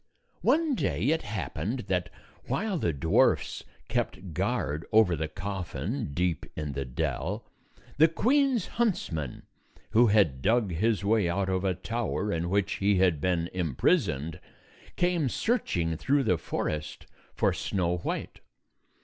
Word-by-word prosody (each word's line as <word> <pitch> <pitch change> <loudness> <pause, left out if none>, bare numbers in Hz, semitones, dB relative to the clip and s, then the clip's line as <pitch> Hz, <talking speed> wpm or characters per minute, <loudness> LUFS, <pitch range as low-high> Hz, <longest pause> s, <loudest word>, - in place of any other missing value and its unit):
One 320 -2 +3
day - - -1
it 160 +1 +2
happened 105 - -3
that, 90 -4 -1 0.4
while 200 -4 -1
the 85 - +1
dwarfs 80 +3 +2 0.2
kept 95 -3 -2
guard 75 +1 -1
over 110 -5 +5
the 80 0 -2
coffin, 95 - -4
deep 90 -4 0
in 75 -2 -3
the 70 0 -3
dell, 60 0 -3 0.5
the 155 +3 +7
queen's 255 - +2 0.2
huntsman, 80 - -1 0.5
who 120 +2 +6
had 95 -12 +3
dug 110 - +2
his 105 +4 +1
way 105 -4 +3
out 95 +2 0
of 95 -1 +1
the 95 -1 0
tower 105 0 -2
in 85 +1 -1
which 100 +1 +1
he 100 +1 +3
had 90 -5 +3
been 85 -1 +1
imprisoned, 80 - 0 0.6
came 175 -6 +1
searching 90 - 0
through 140 - +2
the 90 -8 +2
forest 75 -1 -3 0.3
for - - +2
Snow 90 -2 -1
White. 85 - -4
95 Hz, 135 wpm, -28 LUFS, 80-120 Hz, 0.6 s, the